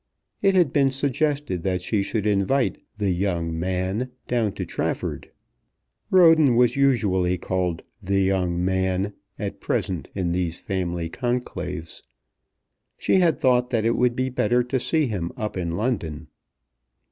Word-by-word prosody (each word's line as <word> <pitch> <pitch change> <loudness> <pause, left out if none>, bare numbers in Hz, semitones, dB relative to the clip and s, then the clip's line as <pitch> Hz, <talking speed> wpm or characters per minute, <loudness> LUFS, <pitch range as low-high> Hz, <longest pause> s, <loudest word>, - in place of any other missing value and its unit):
It 195 -1 +3
had 175 -7 +3
been 140 -2 +4
suggested 140 - -1
that 90 0 -1
she 105 +2 0
should 105 +1 -2
invite 105 +6 +1 0.2
"the 100 -2 0
young 85 -3 -1
man" 95 +7 -1 0.2
down 115 -4 +1
to - - -4
Trafford. - - -3 0.8
Roden 160 -8 +6
was 125 0 +4
usually 100 -10 +2
called 90 -2 -2 0.2
"the 95 +1 0
young 90 -2 +1
man" 95 +1 0 0.2
at 100 -1 -5
present 90 -3 -2
in 90 -3 -1
these 90 -1 -1
family 90 -3 -3
conclaves. 90 -7 -4 1.0
She - - +2
had 170 -4 +3
thought 125 -4 +3
that 115 -3 0
it 115 - +2
would 125 -1 +2
be 130 +1 0
better 120 0 +2
to 125 +2 -1
see 155 +4 +1
him 95 -8 -3
up 105 -1 -3
in 85 -3 -2
London. 85 - -2
100 Hz, 145 wpm, -24 LUFS, 90-125 Hz, 1.0 s, Roden